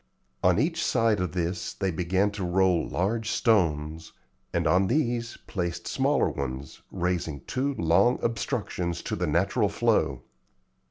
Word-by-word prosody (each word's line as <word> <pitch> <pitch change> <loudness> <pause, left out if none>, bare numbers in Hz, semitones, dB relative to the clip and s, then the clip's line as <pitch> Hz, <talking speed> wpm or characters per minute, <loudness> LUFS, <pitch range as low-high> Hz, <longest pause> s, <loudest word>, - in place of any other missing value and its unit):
On - - +4
each - - +1
side 115 -3 +2
of 90 -3 -2
this 85 0 -2
they 95 -2 -1
began 95 +4 +1
to 100 -1 -5
roll 90 -1 +2
large 110 +5 -1
stones, 80 -9 +1 0.4
and 85 0 0
on 90 +4 +3
these 120 -3 0
placed 85 -4 -3
smaller - - +2
ones, 65 0 -5
raising 90 -6 -2
two 135 - -2
long 95 +8 +3
obstructions 90 -6 -2
to - - -2
the 90 0 -1
natural 100 +7 +2
flow. 115 +2 +1
90 Hz, 140 wpm, -27 LUFS, 85-110 Hz, 0.4 s, On